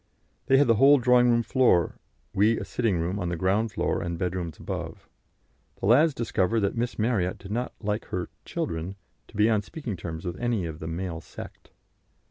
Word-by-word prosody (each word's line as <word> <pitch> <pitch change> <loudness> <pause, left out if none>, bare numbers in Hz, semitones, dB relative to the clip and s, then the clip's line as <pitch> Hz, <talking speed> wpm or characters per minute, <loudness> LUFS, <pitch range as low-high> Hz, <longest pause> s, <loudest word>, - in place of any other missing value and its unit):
They 135 0 +5
had 145 - +5
the 115 -2 +3
whole 140 +4 +7
drawing 125 -1 +4
room 115 0 +3
floor: 120 - +2 0.3
we 110 +4 +3
a - - -5
sitting 115 -7 0
room 90 +5 -2
on 90 -2 -2
the 85 - -1
ground 100 +6 +1
floor - - -1
and 85 -1 -3
bedrooms 90 -2 -3
above. - - -6 0.7
The - - -3
lads 140 +8 +5
discovered 115 -1 0
that 100 - 0
Miss 120 +1 -2
Marryat 105 -5 0
did 100 - -10
not 120 +3 -2
like 105 0 -2
her 90 -1 -4
"children" 85 +4 -4 0.3
to - - -12
be 105 +1 +5
on 110 -2 +2
speaking 120 - -6
terms 80 0 -6
with 85 0 -4
any 120 -6 0
of 80 -1 -6
the 80 - -6
"male 85 0 -4
sect." - - -11
105 Hz, 195 wpm, -26 LUFS, 90-120 Hz, 0.7 s, whole